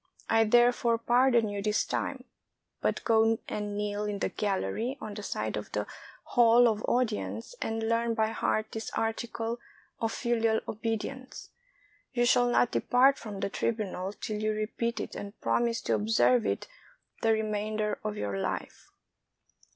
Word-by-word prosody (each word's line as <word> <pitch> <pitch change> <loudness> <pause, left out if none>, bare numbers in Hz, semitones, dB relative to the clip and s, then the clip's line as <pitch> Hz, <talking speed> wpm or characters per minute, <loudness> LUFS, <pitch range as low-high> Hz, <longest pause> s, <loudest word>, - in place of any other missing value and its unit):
I 225 0 +4
therefore 240 +1 +4
pardon 240 0 +3
you 205 -1 -3
this 210 +1 +1
time; - - -3 0.6
but - - 0
go 225 0 +4
and 205 -1 -3
kneel 205 0 -2
in 205 -1 -2
the - - -1
gallery 210 - -2
on 215 - -6
the 210 - -6
side 110 - -3
of 105 - -5
the 105 0 -1 0.4
hall 240 0 +5
of 220 -2 0
audience, 230 - -1
and 225 0 -2
learn 230 0 +1
by 220 0 +2
heart 215 -1 -1
this 220 0 -4
article 225 +1 -2 0.4
of 225 -1 0
filial 230 -2 +1
obedience. 225 +4 -4 0.6
You 240 -1 +2
shall 245 0 +4
not 240 0 +3
depart 265 +3 +4
from 205 -3 -7
the - - 0
tri - - 0
bunal 200 -4 -3
till 215 -2 -3
you 215 0 +1
repeat 220 +2 -2
it - - -5
and 200 +1 -7
promise 235 -1 +1
to 115 - 0
observe 110 +2 +3
it 100 0 -2 0.5
the 225 - +3
remainder 215 -1 -1
of 210 -1 -3
your 100 - -2
Hfe." 95 - -4
220 Hz, 160 wpm, -29 LUFS, 205-235 Hz, 0.6 s, hall